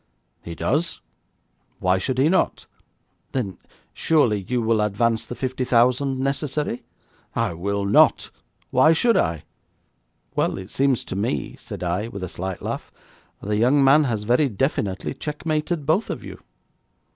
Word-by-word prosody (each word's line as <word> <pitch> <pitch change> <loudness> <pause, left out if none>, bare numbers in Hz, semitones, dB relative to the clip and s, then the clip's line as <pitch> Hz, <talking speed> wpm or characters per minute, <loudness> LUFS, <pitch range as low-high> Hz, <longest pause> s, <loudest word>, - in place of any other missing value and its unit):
'He 85 - -7
does. 155 - -1 0.8
Why 90 +1 +2
should 130 +7 -2
he 135 +3 +4
not?' 185 +3 +1 0.7
'Then 100 -10 -3 0.3
surely 120 -11 +2
you 125 0 0
will 115 -1 +2
advance 110 +2 0
the 120 - -6
fifty 130 0 -2
thousand 125 +2 +2
necessary?' 140 -1 -1 0.5
'I - - 0
will 100 +4 -2
not. 100 - +4 0.4
Why 155 +6 +5
should 230 +7 +3
I?' 80 -2 +1 0.9
'Well, - - +1
it 95 +1 -8
seems 135 -2 +1
to - - -6
me,' 95 - -2
said - - -7
I, 90 +5 -1
with 100 -4 -7
a 90 - -4
slight 95 +1 -5
laugh, - - -4 0.5
'the 105 +1 -1
young 130 +6 +4
man 145 +3 +6
has 110 -5 -1
very 125 +6 +3
definitely 105 -4 -1
checkmated 150 +2 -2
both 160 +9 +1
of - - -4
you.' - - -10
120 Hz, 145 wpm, -23 LUFS, 100-140 Hz, 0.9 s, man